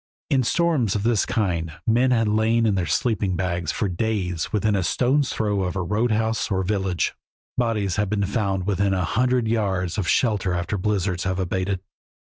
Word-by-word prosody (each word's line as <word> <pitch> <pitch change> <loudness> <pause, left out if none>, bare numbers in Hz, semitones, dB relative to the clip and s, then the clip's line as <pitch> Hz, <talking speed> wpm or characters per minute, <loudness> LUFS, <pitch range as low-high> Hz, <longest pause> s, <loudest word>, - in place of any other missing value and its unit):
In 135 - +4
storms 145 - +1
of 100 - -1
this 115 -2 +2
kind 85 -7 -1
men 120 +3 +3
have 115 -3 +2
lain 110 +2 +2
in 105 - +3
their 90 -3 -1
sleeping 100 +2 0
bags 85 -3 -1
for 105 - -1
days 90 -3 -2
within 105 0 +1
a 100 - +1
stone's 130 - +1
throw 105 -3 0
of 90 -1 -2
a 95 - -1
road 110 +6 0
house 110 0 0
or 95 -2 0
village. 95 -2 -1 0.4
Bodies 110 -7 0
have 105 -2 0
been 100 -1 0
found 100 -3 -1
within 100 -1 +1
a 90 -2 0
hundred 125 +3 +1
yards 100 -4 0
of 95 - -2
shelter 100 -1 +1
after 85 +3 -2
blizzards 95 -2 -1
have 95 -1 -1
abated. 95 0 -1
100 Hz, 185 wpm, -23 LUFS, 95-110 Hz, 0.4 s, In